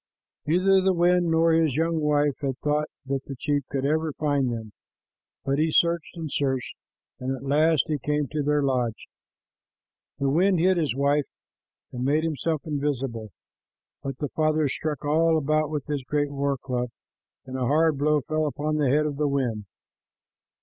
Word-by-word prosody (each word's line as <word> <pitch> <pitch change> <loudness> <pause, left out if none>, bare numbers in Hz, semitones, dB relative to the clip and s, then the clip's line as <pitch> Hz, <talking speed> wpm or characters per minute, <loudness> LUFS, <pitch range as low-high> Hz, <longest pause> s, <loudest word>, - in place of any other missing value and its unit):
Neither 190 +4 +4
the 190 0 +2
wind 175 0 +3
nor 165 0 +3
his 160 -4 +2
young 165 +1 +1
wife 150 -1 +2
had 135 -3 -2
thought 150 +1 +1 0.2
that 135 0 -2
the 135 - -6
chief 145 +1 0
could 135 -1 -2
ever 155 +1 0
find 140 -4 0
them, 110 -2 -6 0.7
but 140 +1 0
he 160 +1 +2
searched 170 +2 +1
and 165 -1 -4
searched, 130 -3 -1 0.4
and 130 +1 -2
at - - -11
last 150 +2 +3
he 150 -2 -1
came 150 0 -1
to 150 0 -2
their 145 0 +1
lodge. 125 -5 -1 1.1
The 140 -1 0
wind 185 +5 +3
hid 185 +2 +3
his 150 -7 0
wife 140 +1 +1 0.6
and 125 0 -4
made 150 +4 +2
himself 160 -1 -1
invisible, 135 -7 -2 0.7
but 135 -2 -5
the 145 - -3
father 155 -1 +1
struck 150 +2 -3
all 160 +2 +3
about 155 0 +1
with 150 -3 -3
his 145 -3 -3
great 145 +2 -1
war 140 0 -1
club, 125 -1 -3 0.6
and 130 0 -7
a 130 -2 -1
hard 155 0 +2
blow 150 +1 +2
fell 155 +3 -1
upon 150 +1 -2
the 145 -3 +2
head 150 +3 +3
of 145 -2 -3
the 150 0 +1
wind. 125 -7 -1
150 Hz, 175 wpm, -25 LUFS, 135-155 Hz, 1.1 s, Neither